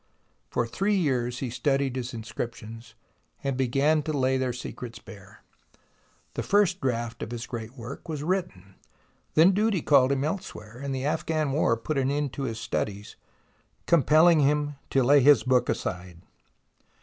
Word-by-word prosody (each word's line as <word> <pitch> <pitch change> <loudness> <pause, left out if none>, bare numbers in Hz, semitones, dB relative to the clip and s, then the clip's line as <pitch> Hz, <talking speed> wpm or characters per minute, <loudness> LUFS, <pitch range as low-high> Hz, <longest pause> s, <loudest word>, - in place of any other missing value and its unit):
For 120 - 0
three 195 - 0
years 125 -8 0
he 130 -3 -3
studied 135 0 0
his 130 -1 -4
inscriptions, 115 0 -7 0.5
and 135 -1 -1
began 135 +4 +2
to 155 - -3
lay 130 -2 +1
their 130 -1 0
secrets 120 -1 -7
bare. 105 0 -14 0.9
The - - -3
first 195 -2 +2
draft 120 -3 -2
of - - -4
his 120 0 -5
great 120 +2 -7
work 125 +7 -9
was 150 -2 -4
written. 175 - -3 0.6
Then 165 +5 +7
duty 205 -3 +1
called 135 -2 +4
him 140 0 0
elsewhere, 125 - -5
and 140 0 -3
the 130 +1 -3
Afghan 155 -1 -1
War 135 -5 +2
put 140 +5 -2
an 130 0 +1
end 145 -1 -1
to 140 - -3
his 110 -1 -6
studies, 105 -2 -4 0.7
compelling 160 +1 +5
him 145 +1 +1 0.2
to 135 - +2
lay 140 +3 +5
his 140 -3 +6
book 130 -1 +2
aside. 90 -1 -4
135 Hz, 160 wpm, -26 LUFS, 120-150 Hz, 0.9 s, Then